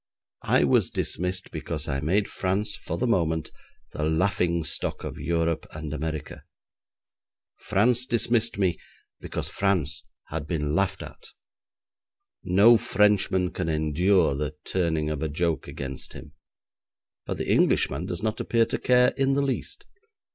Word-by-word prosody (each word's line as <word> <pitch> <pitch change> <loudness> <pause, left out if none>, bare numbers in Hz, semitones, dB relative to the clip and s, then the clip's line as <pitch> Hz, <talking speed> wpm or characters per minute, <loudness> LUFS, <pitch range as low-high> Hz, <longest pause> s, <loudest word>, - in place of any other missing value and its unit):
I - - +4
was - - +3
dismissed 90 +2 -2
because 80 -1 -5
I 70 -2 -1
made 95 +8 +1
France 100 +3 -1
for - - -5
the 125 - 0
moment 80 -9 0 0.4
the - - -5
laughing 85 +1 +1
stock - - -2
of - - -6
Europe 85 -1 -1
and 75 -1 -5
America. 80 -1 -5 1.1
France 120 +5 +2
dismissed 115 -2 +1
me 95 -4 +1 0.4
because - - -5
France 90 -7 0 0.3
had 75 -1 -4
been 75 -3 -1
laughed 95 +2 0
at. - - -11 1.2
No 100 +5 +6
Frenchman 95 -3 +2
can 80 - -3
endure 80 +3 +2
the 75 +2 -3
turning 80 -4 0
of 75 - -3
a 80 - -1
joke 80 +2 -1
against 65 -1 -6
him, 70 - -11 1.0
but - - -3
the - - -2
Englishman 80 +7 +2
does 90 +2 -4
not 110 0 -1
appear 115 -1 +2
to - - -3
care 125 0 +4
in 135 0 +2
the 140 +1 +1
least. 135 -1 -3
90 Hz, 140 wpm, -26 LUFS, 80-105 Hz, 1.2 s, No